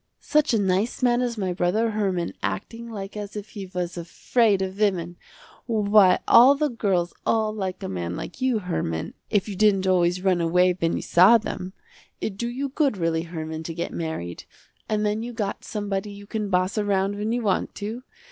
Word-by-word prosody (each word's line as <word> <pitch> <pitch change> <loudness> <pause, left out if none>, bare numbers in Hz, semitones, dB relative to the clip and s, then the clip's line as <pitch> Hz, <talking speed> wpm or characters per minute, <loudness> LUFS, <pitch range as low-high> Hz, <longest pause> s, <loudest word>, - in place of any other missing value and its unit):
"Such 300 -1 +2
a 230 - +3
nice 195 +6 0
man 245 0 +3
as 240 -2 -2
my 190 -3 -1
brother 205 +6 +1
Herman 190 -5 -1
acting 230 - -4
like 200 -2 -7
as 205 -1 -6
if 210 0 -6
he 200 -3 -7
was 180 -1 -4
afraid 200 +4 +1
of 190 +1 -5
women. 180 -5 0 0.5
Why 210 -4 +5
the 280 +3 +6
girls 185 -6 0
all 220 -1 +1
like 190 -3 -4
a - - -3
man 90 -2 -4
like - - -7
you 255 -3 +2
Herman, 165 - -3 0.2
if 205 -1 +1
you 205 - -5
didn't 195 -1 +3
always 180 -1 +2
run 185 -3 +2
away 180 +2 +3
when 165 -2 -1
you - - -3
saw 190 +7 +6
them. 185 -4 -6 0.5
It 205 - -3
do 235 +4 -3
you 270 +3 -3
good 275 -5 +1
really 165 -2 0
Herman 160 -2 -5
to 160 0 -6
get 170 - -4
married, 160 - -5 0.4
and 215 0 0
then 210 +1 0
you 240 +1 -5
got 210 -4 -3
somebody 205 -1 -3
you 200 0 -11
can 210 0 -3
boss 185 +3 +1
around 200 -1 +1
when 210 +2 -2
you 240 0 -1
want 200 -3 0
to. 215 +4 -5
200 Hz, 195 wpm, -24 LUFS, 180-220 Hz, 0.5 s, the